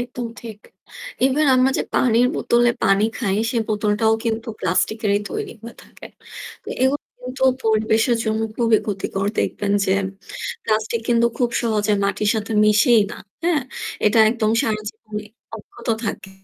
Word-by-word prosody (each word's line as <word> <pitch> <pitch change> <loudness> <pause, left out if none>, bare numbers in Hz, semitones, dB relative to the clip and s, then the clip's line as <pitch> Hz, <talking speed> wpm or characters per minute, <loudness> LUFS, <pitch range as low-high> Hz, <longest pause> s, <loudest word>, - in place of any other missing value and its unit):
একদম 245 0 -5
ঠিক। 220 -3 -9 0.7
Even 280 +3 +2
আমরা 255 +1 +4
যে - - +1
পানির 245 0 +3
বোতলে 240 0 +3
পানি 195 +2 +3
খাই 200 -6 0
সে 240 - -3
বোতলটাও 215 +1 +1
কিন্তু 225 0 -2
প্লাস্টিক 185 +5 0
এরই 200 0 +2
তৈরি - - -4
হয়ে 235 +1 -9
থাকে। - - -13 0.6
তো - - -11
এগুলো 270 +3 +1 0.2
কিন্তু 255 +1 -7 0.2
পরিবেশের 220 +2 +2
জন্য 220 0 0 0.2
খুবই 230 -2 +3
ক্ষতিকর। 195 -1 -2
দেখবেন 200 -1 -1
যে 190 - +1 0.7
প্লাস্টিক 220 +1 0
কিন্তু 235 -1 +4
খুব 245 -2 +1
সহজে 215 -2 +1
মাটির 205 +1 0
সাথে 220 0 -3
মিশেই 215 +2 +5
না, - - -7 0.3
হ্যাঁ? 335 -5 +2 0.4
এটা 215 +2 +3
একদম 220 -2 0
সারা 215 -1 -1
জীবনই 210 -1 -8 0.3
অব্যাহত 235 +3 -12 0.2
থাকে। 200 -1 -5
220 Hz, 150 wpm, -21 LUFS, 210-240 Hz, 0.7 s, মিশেই